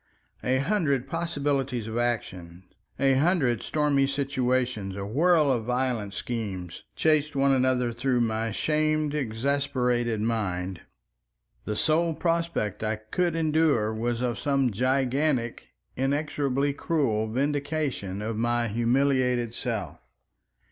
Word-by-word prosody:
A 130 +1 +2
hundred 140 - +1
possibilities 140 -6 -1
of 110 0 -5
action, 95 -7 -3 0.3
a 135 -1 +3
hundred 135 - +2
stormy 145 -3 +1
situations, 130 -7 -1
a 100 0 -4
whirl 150 - +3
of 120 -4 0
violent 125 -5 -1
schemes, 100 -7 -4
chased 155 -1 +2
one 140 0 +3
another 125 -2 +1
through 125 +1 +1
my 115 0 0
shamed, 155 +4 0
exasperated 125 -2 0
mind. 95 -5 -2 0.8
The 105 - -2
sole 160 +6 +2
prospect 165 - -1
I 110 0 0
could 165 +11 -1
endure 155 -9 +2
was 115 +2 -2
of 120 -2 -1
some 135 -3 +1
gigantic, 130 +2 0 0.3
inexorably 140 0 0
cruel 130 -9 0
vindication 140 -6 -2
of 110 0 -3
my 120 0 +1
humiliated 125 +1 +1
self. 110 - -4
130 Hz, 115 wpm, -27 LUFS, 115-145 Hz, 0.8 s, a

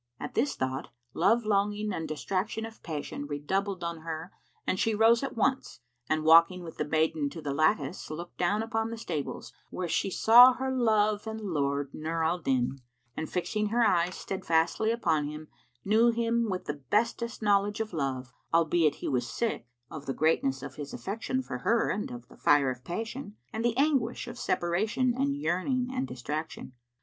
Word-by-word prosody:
At - - -6
this 275 +5 +1
thought, 130 +1 -3 0.3
love 225 +6 +3
longing 210 0 +1
and 160 -3 -3
distraction 190 +8 -2
of 225 0 -11
passion 145 -2 -5
redoubled 185 +6 -2
on 170 -1 -3
her 160 +2 -6 0.3
and 185 - 0
she 225 -1 +1
rose 225 +2 +5
at 270 -3 -4
once 245 - 0 0.3
and 155 0 +1
walking 165 +3 +6
with 165 - -9
the 150 - -1
maiden 155 -1 +1
to 165 - -8
the 145 -3 -3
lattice, 155 +5 0
looked 170 +3 -7
down 200 +5 +1
upon 225 0 -1
the 230 - -5
stables, 155 -10 -5 0.2
where 180 - -3
she 180 - 0
saw 240 +6 +8
her 265 +1 -2
love 215 -4 +2
and 220 0 -4
lord 145 -7 -1
Nur 160 +1 -2
al 170 +3 +1
Din 135 -3 0 0.3
and 155 - -4
fixing 210 +4 -1
her 235 +2 +2
eyes 180 -2 +2
steadfastly 180 +2 0
upon 165 -10 +1
him, 150 +1 -8 0.4
knew 220 +4 +5
him 235 -1 +1
with 185 -1 -3
the 145 -1 -5
bestest 230 +1 0
knowledge 205 +1 +2
of 220 -3 -3
love, 130 -5 -3 0.2
albeit 165 -1 +3
he - - 0
was 125 -3 -1
sick, 225 - -2 0.2
of 145 -2 -8
the 135 - -2
greatness 135 -4 +1
of - - -8
his 145 -2 -6
affection 230 +6 -3
for - - -5
her 235 0 +2
and 210 - -3
of 120 -1 -9
the - - -17
fire 145 -3 +4
of 125 0 -9
passion, 220 - -5 0.2
and 220 +1 -2
the 235 0 +1
anguish 270 -5 +1
of 240 0 -8
separation 215 +9 +1
and 280 +2 0
yearning 250 +3 0
and 260 +1 -1
distraction. 150 +2 -5
185 Hz, 180 wpm, -29 LUFS, 155-225 Hz, 0.4 s, saw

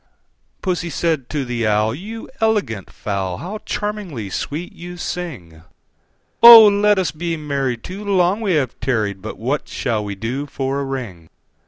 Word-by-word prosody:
II. - - -42 0.6
Pussy 175 -2 -1
said 155 -4 -1
to 145 -3 -2
the 120 -2 -1
Owl, 105 +1 +2
"You 215 - -8
elegant 205 - 0
fowl, 95 -3 -3
How 205 +5 -6
charmingly 190 - -4
sweet 160 - -4
you 175 +1 -9
sing! 125 - -6 0.8
Oh! 230 -2 +12
let 205 0 +4
us 180 -5 0
be 165 +2 -3
married; 140 -5 -2
too 195 +3 -7
long 195 +1 +2
we 200 -4 +1
have 135 -6 -1
tarried: 110 -6 -1
But - - -7
what 135 +6 -2
shall 115 -4 -2
we 100 -1 -5
do 120 +8 -4
for 135 0 -2
a - - -2
ring?" 110 -12 -6
145 Hz, 165 wpm, -20 LUFS, 115-185 Hz, 0.8 s, Oh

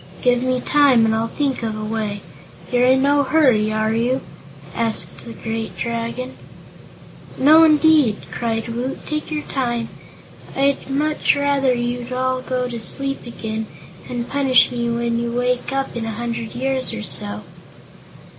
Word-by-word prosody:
"Give 245 -1 +3
me 255 0 0
time 275 -6 +4
and 220 - +2
I'll 225 +1 0
think 275 +1 -2
of 220 -2 -3
a 215 - -5
way. 215 -2 -3 0.5
You're 245 0 +3
in 260 +1 +4
no 285 +1 +4
hurry, 260 -8 +3
are 215 0 0
you?" 245 +4 0 0.5
asked 230 -1 -3
the 235 - -8
great 225 0 -5
Dragon. 235 +2 -3 1.0
"No, 310 +4 +7
indeed," 305 -7 +5
cried 225 -1 -2
Woot. 245 +4 -4
"Take 305 0 -3
your 305 -1 -3
time. 240 -4 -2 0.7
I'd 275 0 +1
much 300 +3 +1
rather 280 -2 +2
you'd 240 +1 -3
all 255 0 0
go 255 -1 -2
to 235 -2 -6
sleep 275 +2 -3
again, 220 -2 -5 0.4
and 240 -1 -3
punish 275 -2 +4
me 235 -1 -2
when 235 0 0
you 235 0 -2
wake 245 +1 0
up 270 -1 -2
in 235 -1 -3
a 225 - -3
hundred 230 0 -4
years 260 +1 -1
or 105 - -5
so." 105 +1 -1
245 Hz, 155 wpm, -20 LUFS, 230-270 Hz, 1.0 s, No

